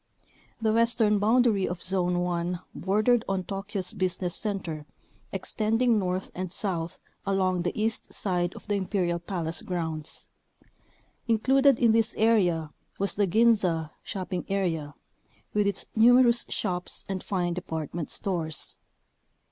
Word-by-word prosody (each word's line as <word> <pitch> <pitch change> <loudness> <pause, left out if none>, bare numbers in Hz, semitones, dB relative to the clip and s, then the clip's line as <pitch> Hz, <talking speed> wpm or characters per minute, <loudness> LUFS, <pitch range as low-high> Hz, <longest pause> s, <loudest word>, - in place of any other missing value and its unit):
The 220 -1 +1
western 230 -2 +3
boundary 220 -2 +3
of 180 0 -5
Zone 180 -1 +1
1 175 0 -1
bordered 215 +5 +2
on 190 -1 0
Tokyo's 195 -1 -4
business 185 -1 -1
center, 170 -8 -4 0.4
extending 225 +1 +1
north 185 0 -2
and 185 -1 -4
south 175 -4 -2 0.3
along 185 -2 +1
the 175 +4 -2
east 220 +1 -1
side 180 -2 -1
of - - -11
the 205 - 0
imperial 185 -3 0
palace 170 -3 -3
grounds. 160 -4 -3 1.0
Included 265 +4 +4
in 235 -2 +4
this 225 0 +2
area 180 -9 +2 0.3
was 200 0 0
the 205 -1 +1
Ginza 185 -6 +3
(shopping 185 -2 -4
area) 165 -7 -1 0.6
with 210 -1 +2
its 200 -1 0
numerous 240 +1 +5
shops 180 -1 -2
and 190 -1 -3
fine 175 -3 -1
department 160 -2 -4
stores. 165 -5 -3
190 Hz, 125 wpm, -27 LUFS, 175-215 Hz, 1.0 s, numerous